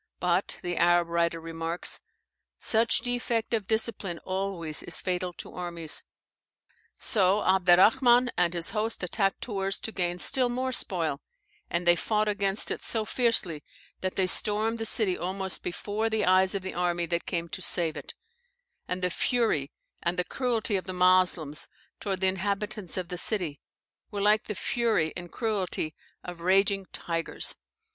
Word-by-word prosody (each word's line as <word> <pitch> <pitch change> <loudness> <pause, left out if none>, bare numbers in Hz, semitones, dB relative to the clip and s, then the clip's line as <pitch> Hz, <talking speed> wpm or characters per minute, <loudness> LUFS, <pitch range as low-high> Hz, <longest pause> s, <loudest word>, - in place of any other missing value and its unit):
But 180 +2 0
(the 175 -1 -3
Arab 175 0 +3
writer 170 0 0
remarks) 165 +1 -2 0.6
such 225 +1 +3
defect 240 -2 -2
of 215 -4 0
discipline 220 -5 -2
always 185 -5 -1
is 175 - -2
fatal 180 -1 -2
to - - -9
armies. 170 -3 -2 0.9
So 200 -2 +4
Abderrahman 220 +7 +5
and 175 0 +1
his 170 -1 0
host 220 -1 -2
attacked 195 +2 -1
Tours 195 -4 -2
to 225 - -5
gain 175 -3 -2
still 250 +7 +2
more 255 +2 -2
spoil, 165 - -1 0.5
and 170 +1 -2
they 175 0 +6
fought 215 +4 0
against 200 -1 +2
it - - -4
so 220 -2 0
fiercely 210 - 0 0.4
that 185 0 -3
they 190 - +2
stormed 215 +4 +3
the 225 - -2
city 200 -5 +3
almost 190 +1 -3
before 205 +5 -3
the 220 -1 0
eyes 185 +2 +4
of 195 - -3
the 190 - -5
army 175 -1 0
that 170 0 -3
came 170 -1 -2
to 185 - -6
save 165 -4 +4
it; - - -8 0.7
and 180 0 -4
the 180 - +1
fury 220 - 0 0.3
and 170 +1 -1
the 180 - +1
cruelty 230 -2 -1
of 185 - -6
the 185 - -5
Moslems 180 -4 +2 0.3
towards 195 -2 -3
the 190 - +3
inhabitants 195 0 -2
of 180 -2 -4
the 180 -1 -2
city 175 -9 -1 0.5
were 205 - -5
like 210 +1 +3
the 210 - -4
fury 220 -11 0
and 175 -1 -8
cruelty 195 -8 -1 0.3
of 175 -1 -8
raging 195 +1 +2
tigers. 165 -1 -1
185 Hz, 160 wpm, -27 LUFS, 175-215 Hz, 0.9 s, they